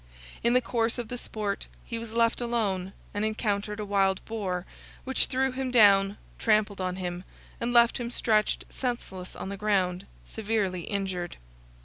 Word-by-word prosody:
In 235 - +4
the 250 - +5
course 230 0 0
of 240 -3 -4
the 245 - -3
sport, 210 -4 -3 0.2
he 230 - -3
was 230 -1 -6
left 230 +1 +2
alone, 200 -6 -1 0.2
and 205 - -1
encountered 210 -1 -1
a 210 - -2
wild 195 -1 +2
boar, 190 -5 -2 0.4
which 265 0 +2
threw 265 0 +1
him 260 0 -2
down, 200 -4 +6 0.2
trampled 210 -3 +2
on 185 0 -1
him, 180 -1 -4 0.4
and 235 +1 -1
left 235 0 +5
him 235 -1 -3
stretched 215 -3 +1
senseless 215 -8 -4
on - - -5
the 200 - -4
ground, 190 -2 +1 0.2
severely 205 -5 -1
injured. 190 -4 -3
210 Hz, 160 wpm, -28 LUFS, 195-235 Hz, 0.4 s, down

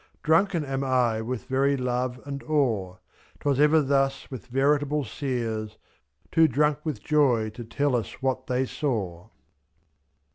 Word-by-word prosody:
Drunken 165 +1 +2
am 135 0 -2
I 125 -4 +1
with 120 +1 -4
very 140 +1 +1
love 125 0 -2
and 140 -1 -5
awe; 120 -12 0
f^J, - - -29 0.4
'Twas 140 -2 +1
ever 150 +1 +5
thus 135 0 0
with 125 -7 -8
veritable 145 +3 +1
seers 115 -4 -3 0.3
— 70 0 -39
Too 165 -1 +5
drunk 150 +2 +1
with 155 -3 -4
joy 125 -8 +2
to 120 +3 -8
tell 135 +4 0
us 115 - -3
what 130 -1 -2
they 130 +1 +1
saw. 100 - -3
130 Hz, 150 wpm, -26 LUFS, 120-145 Hz, 0.4 s, ever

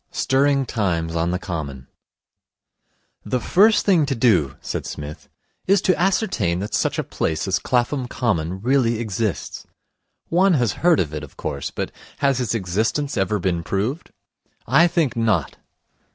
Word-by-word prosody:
Stirring 140 0 +2
Times 85 -8 -1
on 85 +1 0
the 90 - 0
Common 80 -9 -5 1.4
'The 125 - -1
first 210 - +4
thing 175 -8 +4
to 135 - -1
do,' 95 - +2
said - - -4
Psmith, 75 +1 -8 0.4
'is 195 +1 +5
to 185 - +3
ascertain 180 - +1
that 100 +3 -5
such - - 0
a - - 0
place 80 +3 -2
as 95 -1 +1
Clapham 125 +1 0
Common 95 -8 -1
really 120 -2 +2
exists. 110 -2 -3 0.6
One 180 +1 +4
has 120 -7 +2
heard 175 -2 +4
of 75 -4 -1
it, 75 - -4
of 75 - -12
course, 70 - -4
but - - -4 0.3
has 140 -2 +1
its 120 -2 -1
existence 110 +9 -1
ever 95 +2 +1
been 90 -3 -1
proved? 105 - -2 0.6
I 155 +8 +5
think 165 -7 0
not. 110 -10 0
115 Hz, 150 wpm, -22 LUFS, 85-140 Hz, 1.4 s, is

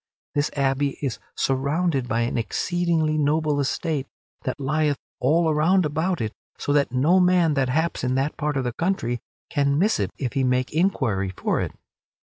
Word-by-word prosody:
This 145 0 +1
abbey 140 0 0
is 130 -5 -2 0.2
surrounded 140 +1 0
by 115 0 0
an 115 - -1
exceedingly 160 +4 0
noble 150 0 +1
estate 140 0 -1 0.4
that 130 +2 -2
lieth 145 +1 +1 0.2
all 160 +6 +3
around 160 +4 +3
about 160 +4 -1
it 110 -1 -2 0.2
so 145 - -1
that 140 -3 +2
no 150 +9 +4
man 180 -3 +4
that 135 -3 +1
haps 160 +3 0
in 125 0 +1
that 135 +3 0
part 150 -2 -1
of 135 - 0
the 125 -1 -2
country 125 -8 -1 0.3
can 140 0 +2
miss 205 +7 +2
it - - 0
if 130 -4 -3
he 135 - +1
make 125 +1 +1
inquiry 130 - +1
for - - 0
it. - - -3
145 Hz, 175 wpm, -24 LUFS, 130-160 Hz, 0.4 s, no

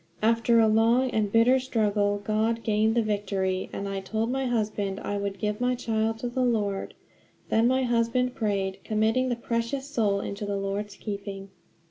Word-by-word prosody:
After 230 +1 +4
a 225 - +5
long 230 +4 +3
and 210 -2 0
bitter 235 +4 +5
struggle 205 -5 0
God 220 +2 0
gained 220 0 +2
the 235 - +3
victory, 195 -3 -1
and 200 - -4
I 195 0 -3
told 220 +4 -2
my 265 0 -1
husband 210 -4 -1
I 205 - -3
would 200 -1 -3
give 210 +1 -2
my 250 0 +2
child 225 -2 -1
to 245 - -2
the 245 +2 -2
Lord. 210 -5 -1 0.5
Then 225 +1 +3
my 260 +1 +2
husband 240 +1 +1
prayed, 195 -4 -1
committing 220 +4 +1
the 245 - 0
precious 235 +3 -2
soul 215 -8 +1
into 200 +1 -5
the 205 -1 -2
Lord's 200 +1 -3
keeping. 200 -2 -6
220 Hz, 175 wpm, -27 LUFS, 200-235 Hz, 0.5 s, a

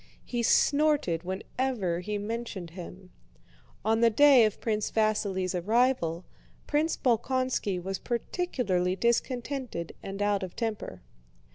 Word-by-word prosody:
He 240 -1 -2
snorted 285 - +3
whenever 190 0 -2
he 210 +3 -3
mentioned 205 -4 -5
him. 180 +1 -10 0.7
On 225 +1 +2
the 235 - +6
day 265 0 +7
of 215 - -2
Prince 215 -2 -1
Vasíli's 205 -4 0
arrival, 185 -3 +1 0.4
Prince 305 +2 0
Bolkónski 250 -5 0
was 190 +2 -4
particularly 235 - -1
discontented 240 - -1
and 195 0 -6
out 205 -1 +1
of 185 -2 -6
temper. 215 - -4
215 Hz, 115 wpm, -28 LUFS, 185-250 Hz, 0.7 s, day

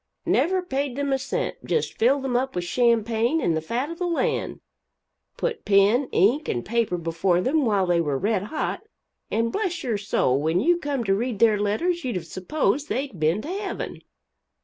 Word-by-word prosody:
Never 370 +1 +2
paid 275 -5 -2
them 280 0 -1
a 270 - +1
cent; 375 - -3
just 465 - -1
filled 265 +4 +2
them 260 -2 -1
up 265 +2 0
with 180 - -1
champagne 235 - +2
and 170 - +1
the 160 - -1
fat 245 - -2
of 335 - -8
the 360 - 0
land, 340 - -1 0.8
put 475 -2 -2
pen, 205 +6 +3
ink 245 - +2
and 120 - -2
paper 225 -5 0
before 170 +2 0
them 275 +8 +1
while 200 -4 +2
they 175 -1 +2
were 145 -4 -1
red 200 +3 0
hot, 310 +8 -3 0.5
and 230 +1 0
bless 365 - -2
your 230 -6 -1
soul 140 - +1
when 160 +3 +1
you 345 - +3
come 285 -6 -2
to 195 -3 +2
read 230 +2 -1
their 215 -1 +4
letters 335 - 0
you'd 245 -5 -2
have 175 -2 -3
supposed 270 - -1
they'd 265 - -3
been 160 +7 +1
to - - -7
heaven. 390 +1 -4
235 Hz, 195 wpm, -24 LUFS, 195-285 Hz, 0.8 s, their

